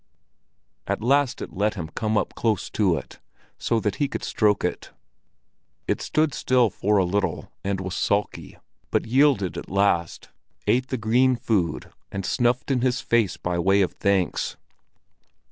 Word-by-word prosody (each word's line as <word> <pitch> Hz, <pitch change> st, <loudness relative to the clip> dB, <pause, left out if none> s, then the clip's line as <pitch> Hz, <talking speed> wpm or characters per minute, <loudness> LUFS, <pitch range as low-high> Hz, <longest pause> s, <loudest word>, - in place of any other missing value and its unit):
At -, -, -2 dB
last 140 Hz, +1 st, +2 dB
it -, -, -9 dB
let 105 Hz, +3 st, 0 dB
him 85 Hz, -5 st, -5 dB
come 110 Hz, +5 st, -2 dB, 0.2 s
close 110 Hz, -5 st, -1 dB
up -, -, -39 dB
to 95 Hz, -6 st, +2 dB
it, -, -, -9 dB, 0.4 s
so 115 Hz, -, +1 dB
that 105 Hz, -2 st, -1 dB
he 145 Hz, -, +1 dB
could -, -, -5 dB
stroke 105 Hz, -2 st, +1 dB
it. -, -, -3 dB, 1.0 s
It -, -, 0 dB
stood 155 Hz, -2 st, +1 dB
still 125 Hz, -4 st, +2 dB
for 105 Hz, +3 st, +1 dB
a 95 Hz, -, +3 dB
little 100 Hz, +3 st, -2 dB
and 100 Hz, -1 st, -1 dB
was 95 Hz, -1 st, -4 dB
sulky, 100 Hz, +1 st, -1 dB, 0.3 s
but -, -, 0 dB
yielded 130 Hz, -6 st, +2 dB
at -, -, -10 dB
last, 95 Hz, -4 st, 0 dB, 0.4 s
ate 125 Hz, +2 st, +2 dB
the 130 Hz, -, -2 dB
green 125 Hz, +4 st, +3 dB
food 105 Hz, -10 st, -1 dB, 0.2 s
and 100 Hz, -1 st, -4 dB
snuffed 125 Hz, +4 st, +1 dB
in 130 Hz, -2 st, +1 dB
his 130 Hz, +1 st, +1 dB
face 115 Hz, -7 st, +1 dB
by 90 Hz, -1 st, -2 dB
way 95 Hz, +3 st, +4 dB
of 90 Hz, -, -2 dB
thanks. 100 Hz, -3 st, 0 dB
105 Hz, 160 wpm, -24 LUFS, 95-125 Hz, 1.0 s, way